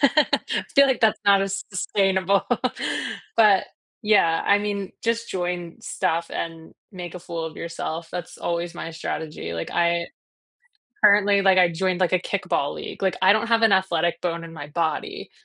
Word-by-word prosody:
I 295 +2 +5 0.5
feel 280 0 +7
like 265 - 0
that's 220 -1 +3
not 200 -1 +5
as 195 0 -3
sustainable, 190 0 +1 0.9
but 210 -4 +5 0.4
yeah, 195 -6 +3
I 200 - +5
mean, 205 -2 -3
just 230 0 0
join 175 -2 -4
stuff 165 +1 -2
and 165 -1 -6 0.2
make 175 -2 -7
a - - -5
fool 170 -1 -5
of 160 - -7
yourself, 165 0 -5
that's 180 -1 -6
always 170 0 -3
my 165 -1 -6
strategy, 155 - -5
like, 80 - -5
I 170 0 +1 1.0
currently, 205 -1 +5
like, 190 -1 +4
I 180 -2 +5
joined, 185 +2 -1
like, 185 - +2
a 185 - +4
kickball 180 -7 -2
league, - - -8
like, 190 -2 0
I 190 +2 +6
don't 220 +2 0
have 230 0 +3
an 220 - +5
athletic 175 -3 +1
bone 170 -1 -2
in 165 0 -10
my 145 -2 -8
body, 160 +1 -3
180 Hz, 170 wpm, -23 LUFS, 170-200 Hz, 1.0 s, feel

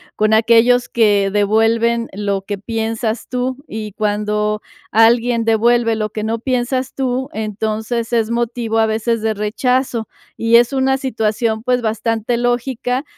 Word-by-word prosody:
con 215 +1 +2
aquellos 235 +2 +4
que 205 -4 +2
devuelven 225 +3 +2
lo 200 -1 -2
que 205 +1 -4
piensas 225 +2 -3
tú. 250 +1 -2
Y 215 -1 -6
cuando 210 +1 -1 0.3
alguien 230 +1 +3
devuelve 230 +1 +2
lo 215 -1 -2
que 215 - -4
no 225 +1 -2
piensas 255 +1 -1
tú, 260 0 -2
entonces, 220 +2 -3
es 225 -1 +1
motivo 235 -1 -1
a 220 - +4
veces 225 +1 -1
de 220 0 0
rechazo. 230 +3 -1 0.3
Y 230 0 +2
es 240 +2 +5
una 265 0 +1
situación, 225 -3 -1
pues, 250 0 +1
bastante 225 +1 -1
lógica, 245 +1 -1
225 Hz, 140 wpm, -18 LUFS, 215-245 Hz, 0.3 s, es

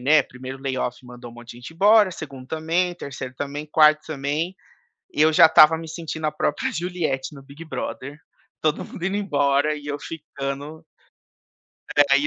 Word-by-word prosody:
né. 150 +4 +5
1º 130 +1 -9
layoff 130 -2 -2
mandou 120 -1 -11
um - - -15
monte 120 0 -12
de - - -14
gente 125 +6 -10
embora; 205 +3 +5
2º 135 -6 -9
também; 165 +4 -1
3º 130 -5 -7
também; 145 +2 -5
4º 155 0 +5
também. 155 +4 -2 0.6
E 150 - +3
eu 160 +1 +5
já 155 - +8
estava 160 0 +7
me 165 - -8
sentindo 160 -1 -5
a 150 - 0
própria 150 -1 -1
Juliette 165 -6 -2
no 140 - -12
Big 140 +4 -12
Brother, 145 -2 -6 0.4
todo 155 -1 0
mundo 175 - -8
indo 195 +1 -1
embora 145 -6 +1
e 145 -1 -10
eu 145 0 -3
ficando. 145 0 -6 1.1
É, 140 -1 +5
e, 145 - 0
150 Hz, 175 wpm, -23 LUFS, 140-160 Hz, 1.1 s, já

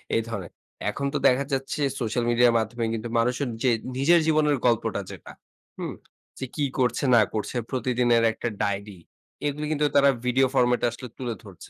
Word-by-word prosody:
এই 115 - +3
ধরনের। 95 -7 -5 0.4
এখন 140 +6 -3
তো - - +1
দেখা 130 +2 +3
যাচ্ছে, 135 +3 -2 0.2
সোশ্যাল 120 0 -1
মিডিয়ার 120 0 +4
মাধ্যমে 115 +1 -2
কিন্তু 115 +1 -4
মানুষের 125 +3 0
যে 130 - +4 0.3
নিজের 165 +6 +5
জীবনের 150 -2 +3
গল্পটা 115 -2 +1
যেটা, - - -10 0.5
হুম? - - -4 0.5
যে 130 - -3
কি 150 - -1 0.2
করছে 125 +2 +1
না 115 - +7
করছে 110 +3 -3
প্রতিদিনের 120 -2 +2
একটা 115 - -5 0.2
ডায়রি। 100 -2 -3 0.5
এগুলো 150 +1 -2
কিন্তু 150 -1 +1
তারা 140 0 +6 0.2
ভিডিও 130 +2 +3
ফরমেট 125 -1 +3
এ - - +4
আসলে 125 +2 -8
তুলে 125 -3 -3
ধরছে। 95 -5 -13
125 Hz, 175 wpm, -25 LUFS, 115-135 Hz, 0.5 s, না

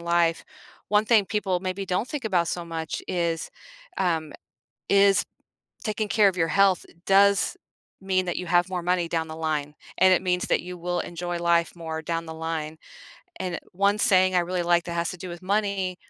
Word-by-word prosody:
life 170 -1 +1 0.5
one 210 0 +4
thing 220 -3 +4
people 190 -4 -1
maybe 190 +1 -3
don't 190 +6 -1
think 295 -6 -5
about 175 -6 +1
so 175 - -3
much 165 -1 -5
is, 170 -2 -1 0.5
um 165 -5 0 0.6
is 200 0 +5 0.6
taking 215 -1 -2
care 210 -1 +4
of 185 - -3
your 165 -1 +1
health 195 -2 +3 0.2
does 200 0 +4 0.4
mean 190 -1 0
that 175 - -2
you 180 - -5
have 175 +1 +3
more 180 - -2
money 180 0 +1
down 160 -1 -2
the 160 - -7
line, 150 -2 -2 0.2
and 185 0 +6
it 185 - 0
means 180 -1 0
that - - +2
you 180 0 -8
will 175 +1 -2
enjoy 175 0 -4
life 170 0 +2
more 160 -1 -5
down 165 +1 -2
the 160 - -6
line, 160 -1 -4 0.6
and 180 -2 -3
one 200 +3 +2
saying 185 -4 +4
I 180 - +4
really 175 0 -2
like 175 0 +2
that 170 - -5
has 170 0 -1
to 180 - -7
do 185 - -7
with 175 0 -8
money 195 -2 -1
180 Hz, 195 wpm, -25 LUFS, 170-195 Hz, 0.6 s, and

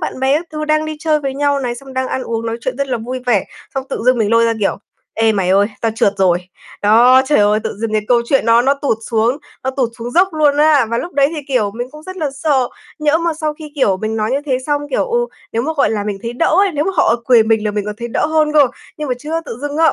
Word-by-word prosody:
bạn - - -4
bè 265 +2 +3
các 340 - -9
thứ 305 0 -3
đang 310 0 +1
đi 310 0 -5
chơi 305 -1 +1
với 275 -2 -3
nhau 285 0 +1
này, 245 -2 -2
xong 265 +2 -11
đang 260 0 -2
ăn 260 - -2
uống 230 -1 -3
nói 225 0 -2
chuyện 255 +2 -3
rất 280 0 -2
là 245 -2 -1
vui 250 +3 -5
vẻ, 215 -6 +2 0.3
xong 270 -1 -2
tự - - -4
dưng 255 -1 +4
mình 215 -2 +1
lôi 230 0 +4
ra, 230 - +2
kiểu: 200 - +1 0.4
"Ê 225 0 +2
mày 195 -3 0
ơi, 200 +2 +4
tao 225 -1 0
trượt 205 -3 +2
rồi." 180 -2 +3 0.4
Đó, 240 +5 +6
trời 295 - +3
ơi! 210 +1 +3
Tự 220 - -4
dưng 225 -1 -2
cái 215 - +1
câu 240 -1 +4
chuyện 270 -5 +2
nó 230 +1 +5
nó 275 +2 +3
tụt 275 -5 -1
xuống 230 +4 +1 0.3
nó 265 - 0
tụt 260 -2 -1
xuống 235 +1 -5
dốc 360 +8 +3
luôn 295 -2 +3
á, 295 -4 +4
và 235 - 0
lúc 350 - -5
đấy 280 0 +3
thì, - - -3
kiểu, 245 -7 +1
mình 245 +2 -4
cũng 305 +2 -12
rất 370 +3 -9
là 310 -6 -2
sợ, 275 -3 0 0.3
nhỡ 305 +1 +2
mà 335 -1 -1
sau 305 -1 -3
khi, 300 -1 -11
kiểu, 235 -10 +2
mình 220 +3 -3
nói 215 0 -1
như 275 +2 0
thế 260 -3 +1
xong, 290 -1 0
kiểu, - - +1
ừ, 480 0 0 0.3
nếu 230 - 0
mà, 315 +5 -1
gọi 280 - +3
là, 210 -2 -2
mình 205 -2 -3
thấy 230 - -4
đỡ 255 +7 0
ấy, 395 -1 +3
nếu 295 +1 0
mà 385 - 0
họ 230 - +4
cười 245 -3 +6
mình 220 -1 +1
là 210 - 0
mình 205 -1 -2
còn 210 0 -4
thấy 235 0 -5
đỡ 235 - 0
hơn 310 -1 +1
cơ. 295 -2 +6 0.3
Nhưng 300 -2 -4
mà 250 - 0
chứa 315 +5 -3
tự 230 - -7
dưng 290 0 -3
á, 325 0 +4
260 Hz, 300 wpm, -17 LUFS, 225-300 Hz, 0.4 s, Đó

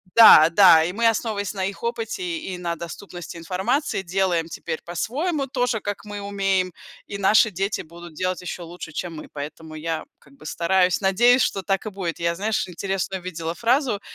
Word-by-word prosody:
Да, 215 -8 +9
да, 170 -2 +7
и 170 - -1
мы, 230 +4 +2
основываясь 220 -3 -1
на 190 -2 -2
их 195 +1 -5
опыте 235 - -3 0.2
и 190 - -6
на 175 -1 -3
доступности 170 +1 -8
информации, 190 - -1
делаем 180 -2 0
теперь 160 - -5
по-своему, 275 - -2
тоже 250 -4 0
как 205 0 -5
мы 205 -1 -7
умеем, 195 -2 0 0.3
и 200 - -5
наши 210 +2 +4
дети 195 +3 -2
будут 170 +1 -12
делать 185 +3 -2
ещё 180 -1 -6
лучше, 170 -1 -9
чем 170 +1 -5
мы. 155 - -9
Поэтому 155 +2 -8
я, 160 +1 -3 0.2
как 140 - -22
бы, 140 - -17
стараюсь, 180 +3 +2
надеюсь, 240 +6 +4
что 195 - 0
так 195 +3 -1
и - - -2
будет. 190 -5 -4
Я, 170 0 0
знаешь, 215 +4 -1
интересную 190 +1 -3
видела 165 -2 -4
фразу, 240 - +1
190 Hz, 180 wpm, -23 LUFS, 170-210 Hz, 0.3 s, Да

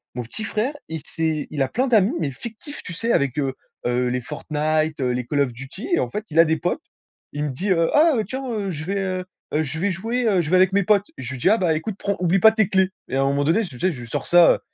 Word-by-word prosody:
mon 125 - -2
petit 120 - -7
frère, 225 +6 -1 0.2
il 160 -1 -4
s'est 160 -2 -2
il 150 -2 -3
a - - 0
plein 255 - 0
d'amis 220 -1 +4
mais 145 - -1
fictifs, 235 - -9
tu 180 - -7
sais? 230 +7 -1
Avec, 140 - +1
heu, 135 -2 -1 0.3
heu, 125 +1 +1
les 125 +1 -1
Fortnite, 155 +3 -1
heu, 125 - +1
les 125 0 -2
Call 145 +3 -1
of 140 -3 +2
Duty 135 - -8
et - - +1
en - - 0
fait, 210 +1 -4
il 155 - -5
a 165 - +8
des 160 0 +2
potes, 175 - -1 0.5
il 145 +1 -2
me 150 - -1
dit: 180 +11 -3
«Heu, 165 -2 +3
ah 315 +2 +6
heu, 220 - +1
tiens, 265 +3 -4
heu, 205 -3 -2
je 155 -4 -4
vais, 195 +4 -2
heu, 185 -1 -2 0.4
je 155 +1 -5
vais 200 +4 +1
jouer, 225 +7 -2
heu, 195 -4 +3
je 155 -1 -4
vais - - +5
avec 185 +1 +5
mes 200 +1 +2
potes». 205 +1 +3
Je 130 -2 -6
lui 130 - -6
dis: 185 - +3
«Ah 220 - +5
bah, 175 -6 +2
écoute 175 +7 -3
prends 200 -1 -1
oublie 180 +1 +2
pas 220 +4 +8
tes 220 -3 +1
clés». 190 -2 +3 0.2
Et - - -3
à 135 - +2
un - - +2
moment 140 +1 +1
donné, 165 +9 +3
tu 130 -9 -10
sais, 185 - +2
je 130 -7 -8
lui 120 - -9
sors - - -3
ça, 175 -1 +7
heu, - - -3
175 Hz, 295 wpm, -22 LUFS, 145-205 Hz, 0.5 s, a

